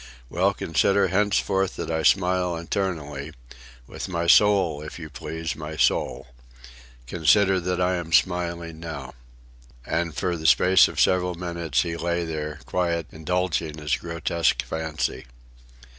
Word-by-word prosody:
"Well, 95 +3 +1
consider 95 +4 +2
henceforth 95 0 +1
that - - -4
I 80 0 0
smile 90 0 +2
internally, 80 -5 -3 0.5
with - - -7
my 85 -2 -2
soul, 95 -4 +4
if 75 - -8
you 80 -3 -9
please, 80 +3 -5
my 80 0 -7
soul. - - +1 0.8
Consider 95 - +3
that 90 0 -2
I 90 0 +1
am 85 -1 -6
smiling 85 +1 0
now." 80 -5 -7 0.7
And 85 -2 -2
for 90 +2 -1
the 80 0 -1
space 95 +1 +6
of - - -6
several 90 -1 +2
minutes 85 -7 -1
he 85 0 -4
lay 85 0 -1
there, 75 -1 -5
quiet, 85 -3 -1
indulging 80 -1 -2
his 75 -2 0
grotesque 85 0 -1
fancy. 80 -4 -3
85 Hz, 135 wpm, -24 LUFS, 80-90 Hz, 0.8 s, space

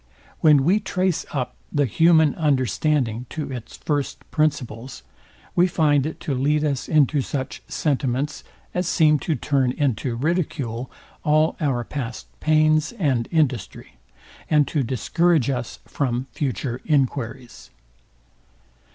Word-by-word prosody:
When 150 -3 +5
we 185 +8 +3
trace 185 -4 -1
up 130 -4 -3 0.2
the 145 -1 +2
human 160 +3 +4
understanding 130 - 0
to 150 -3 -5
its 120 -3 -7
first 145 -2 -2
principles, 130 -5 -2 0.5
we 180 +1 +5
find 150 -5 +2
it 160 - -7
to 145 - -2
lead 145 +4 +1
us 140 -3 -1
into 150 -2 +3
such 130 0 -4
sentiments, 135 +1 -1 0.3
as 180 -1 -1
seem 155 -4 +4
to 160 - -1
turn 135 -1 +1
into 130 -3 -1
ridicule 135 -5 -2 0.3
all 155 +1 +3
our 135 -6 0
past 125 -3 -5
pains 155 +2 +3
and 135 - 0
industry, 140 - -1 0.5
and 150 -2 +4
to 150 - 0
discourage 140 +4 +1
us 125 -3 -4
from 125 -2 -2
future 130 -2 -3
enquiries. 130 -4 -1
145 Hz, 125 wpm, -23 LUFS, 125-155 Hz, 0.5 s, When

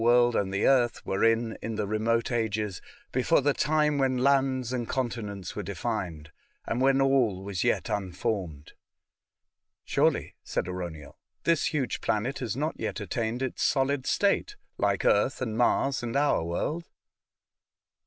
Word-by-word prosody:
165 120 +1 +5 0.2
world 100 - +2
and 95 - -6
the 100 +1 +1
earth 125 -3 +2
were 95 - -1
in 115 0 +2
in 110 0 -4
the 105 -1 -1
remote 115 +3 0
ages, 110 -4 -1 0.3
before 130 +6 +3
the 145 +1 +2
time 150 0 +2
when 130 -1 +2
lands 130 -1 +2
and 120 -2 -3
continents 105 -7 -3
were 105 - -2
defined, 90 -5 -4 0.3
and 120 - -1
when 135 0 +4
all 130 -8 +2
was 100 -2 -4
^^et - - +1
unformed. 90 -5 -4 0.6
*' - - -61
Surely," - - +1
said - - -2
Arauniel, 85 -5 -6
" - - -52
this 170 -3 +2
huge 150 -6 -1
planet 115 +6 -1
has 120 -5 -3
not 155 +3 -1
yet 105 -3 -3
attained 110 +5 -2
its 130 - -3
solid 140 -1 +1
state, - - +1 0.2
like - - +1
Earth 115 +8 +3
and 115 -4 -3
Mars 130 +3 +2
and 120 0 -4
our 145 - +2
world." 150 - -2
115 Hz, 160 wpm, -28 LUFS, 100-135 Hz, 0.6 s, 165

